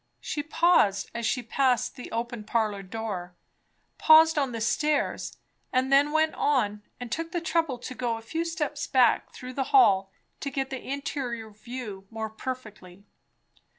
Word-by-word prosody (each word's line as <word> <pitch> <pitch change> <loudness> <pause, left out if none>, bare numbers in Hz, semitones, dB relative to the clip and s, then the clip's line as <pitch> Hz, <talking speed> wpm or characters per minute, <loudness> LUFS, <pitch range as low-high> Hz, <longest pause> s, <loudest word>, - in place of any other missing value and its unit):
She 295 - -3
paused 315 - +3
as 235 -1 -2
she 245 +3 0
passed 250 +1 +1
the 250 - -9
open 235 0 -3
parlour 215 -2 0
door, 190 -3 -5 0.6
paused 320 +1 +7
on 275 -4 0
the 230 - -4
stairs, 285 +6 0 0.3
and 260 +1 +1
then 285 +2 +5
went 315 0 +2
on 210 -8 +1 0.2
and 245 -2 -7
took 330 +4 -3
the 350 - -1
trouble 325 -5 0
to 245 +1 -7
go 240 -2 -2
a 225 - -11
few 320 +9 -2
steps 300 -3 -3
back 250 -4 +3
through 255 0 -9
the 270 0 -1
hall 195 - +4 0.3
to 280 - -3
get 270 0 -3
the 265 - -4
interior 250 -5 -4
view 215 -3 -8
more 220 -1 -5
perfectly. 215 -6 -8
250 Hz, 160 wpm, -27 LUFS, 220-290 Hz, 0.6 s, paused